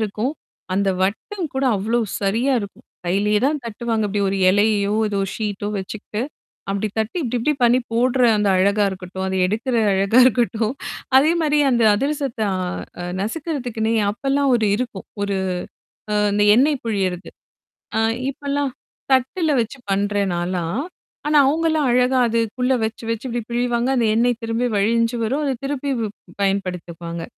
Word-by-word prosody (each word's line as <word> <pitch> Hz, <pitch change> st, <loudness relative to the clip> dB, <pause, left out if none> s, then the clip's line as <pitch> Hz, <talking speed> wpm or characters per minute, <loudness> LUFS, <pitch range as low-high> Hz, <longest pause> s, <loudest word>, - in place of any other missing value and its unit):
இருக்கும். 220 Hz, +5 st, -1 dB, 0.4 s
அந்த 200 Hz, 0 st, +1 dB
வட்டம் 320 Hz, -, -2 dB
கூட 265 Hz, 0 st, 0 dB
அவ்ளோ 220 Hz, +5 st, 0 dB, 0.2 s
சரியா 225 Hz, +7 st, +1 dB
இருக்கும். 200 Hz, -1 st, -9 dB, 0.2 s
கையிலயே 205 Hz, +3 st, +2 dB
தான் 300 Hz, +1 st, 0 dB
தட்டுவாங்க. 225 Hz, 0 st, -2 dB
இப்டி 205 Hz, +1 st, -1 dB
ஒரு 195 Hz, -, -1 dB
எலையையோ 205 Hz, 0 st, +2 dB, 0.2 s
ஏதோ 205 Hz, -1 st, -2 dB, 0.2 s
ஷீட்டோ 205 Hz, -2 st, -3 dB
வச்சுக்கிட்டு. 210 Hz, +2 st, -6 dB, 0.5 s
அப்டி 200 Hz, +2 st, -1 dB
தட்டி 220 Hz, +11 st, -1 dB
இப்டி, 250 Hz, -2 st, -2 dB
இப்டி 300 Hz, +6 st, +2 dB
பண்ணி 240 Hz, +1 st, +5 dB
போடுற 250 Hz, +2 st, +2 dB, 0.2 s
அந்த 210 Hz, -1 st, +1 dB
அழகா 200 Hz, +3 st, +3 dB
இருக்கட்டும், 190 Hz, 0 st, -6 dB
அத 190 Hz, -, -2 dB
எடுக்கற 230 Hz, +6 st, -1 dB, 0.2 s
அழகா 195 Hz, +5 st, +3 dB
இருக்கட்டும். 235 Hz, -2 st, +2 dB, 0.4 s
அதே 300 Hz, +5 st, +5 dB
மாரி 300 Hz, -2 st, +2 dB
அந்த 235 Hz, -2 st, +2 dB
அதிரசத்த 275 Hz, 0 st, -2 dB, 0.6 s
அ -, -, -4 dB, 0.2 s
நசுக்குறதுக்குன்னே 240 Hz, -, -2 dB, 0.2 s
அப்பல்லாம் 275 Hz, +4 st, 0 dB
ஒரு 225 Hz, -3 st, +2 dB
இருக்கும். 235 Hz, -5 st, -5 dB, 0.2 s
ஒரு 200 Hz, -1 st, -1 dB, 1.0 s
அந்த 205 Hz, 0 st, +2 dB
அ -, -, +8 dB
எண்ணெய் 285 Hz, +1 st, +3 dB
புழியிறது. 190 Hz, -5 st, -2 dB, 0.7 s
ஆ -, -, +2 dB, 0.3 s
இப்பல்லாம். 280 Hz, 0 st, -2 dB, 0.4 s
தட்டல 300 Hz, +6 st, +1 dB
வச்சு 230 Hz, +4 st, -6 dB
பண்றேன் 200 Hz, -1 st, 0 dB
நாலாம். 175 Hz, +5 st, -2 dB, 0.5 s
ஆனா, 300 Hz, -, +4 dB
அவங்கலாம் 315 Hz, 0 st, +1 dB
அழகா 250 Hz, +1 st, +3 dB
அதுக்குள்ள 230 Hz, +3 st, 0 dB
வச்சு, 220 Hz, +1 st, -3 dB
வச்சு 230 Hz, +2 st, -3 dB
இப்டி 240 Hz, 0 st, -2 dB
பிழிவாங்க, 240 Hz, +1 st, 0 dB
அந்த 235 Hz, -2 st, +2 dB
எண்ணெய் 240 Hz, +1 st, +2 dB
திரும்பி 230 Hz, +2 st, -1 dB
வழிஞ்சு 230 Hz, +3 st, +2 dB
வரும். 270 Hz, +7 st, 0 dB
அத 275 Hz, -, +1 dB
திருப்பி 280 Hz, 0 st, -2 dB, 0.5 s
பயன்படுத்துக்குவாங்க. 175 Hz, -4 st, -2 dB
230 Hz, 140 wpm, -21 LUFS, 200-260 Hz, 1.0 s, அ